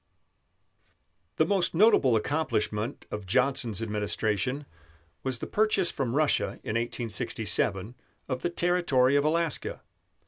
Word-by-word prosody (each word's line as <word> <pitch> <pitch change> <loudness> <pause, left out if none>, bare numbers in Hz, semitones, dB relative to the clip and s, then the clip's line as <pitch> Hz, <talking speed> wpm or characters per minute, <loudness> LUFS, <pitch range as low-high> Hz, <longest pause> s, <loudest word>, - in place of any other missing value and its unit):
The 155 - +3
most 185 -2 0
notable 165 - +5
accomplishment 110 -4 -1
of 105 -2 -5
Johnson's 120 -1 0
administration 110 +5 -1 0.6
was 130 -2 -1
the - - -5
purchase 210 -4 +2
from 130 -3 -2
Russia 150 -1 +2
in - - -3
1867 115 -3 -1 0.3
of 130 -1 -3
the - - 0
territory 170 -7 +2
of 145 - +3
Alaska. 165 +1 -1
130 Hz, 110 wpm, -28 LUFS, 110-160 Hz, 0.6 s, notable